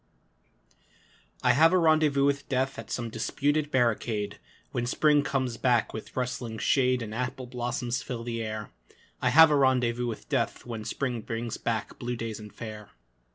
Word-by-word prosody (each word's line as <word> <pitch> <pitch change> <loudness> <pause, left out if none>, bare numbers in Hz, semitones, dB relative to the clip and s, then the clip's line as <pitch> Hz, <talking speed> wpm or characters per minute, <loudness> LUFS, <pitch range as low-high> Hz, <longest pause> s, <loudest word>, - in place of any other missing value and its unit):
I - - +5
have 165 +3 +5
a - - +5
rendezvous 155 -4 +4
with 140 0 0
Death 130 -2 0
At 115 -2 -9
some 120 -2 -3
disputed 145 +5 0
barricade, 115 -5 0 0.3
When 120 0 -2
Spring 150 +3 +4
comes 130 -4 -1
back 120 -2 +2
with 110 - -8
rustling 125 -3 -3
shade 125 0 +2
And 110 -1 -6
apple 125 +2 -3
blossoms 120 0 -2
fill 120 -2 -5
the 115 -1 -3
air 110 -1 -5 0.5
I - - +3
have 160 0 +8
a - - +4
rendezvous 125 -3 +2
with 115 - -6
Death - - -1
When 115 -3 -6
Spring 125 -4 -2
brings 115 +1 -4
back 110 -3 -3
blue 120 0 -3
days 115 -2 -5
and 105 -1 -10
fair. 110 -2 -8
120 Hz, 165 wpm, -28 LUFS, 115-135 Hz, 0.5 s, have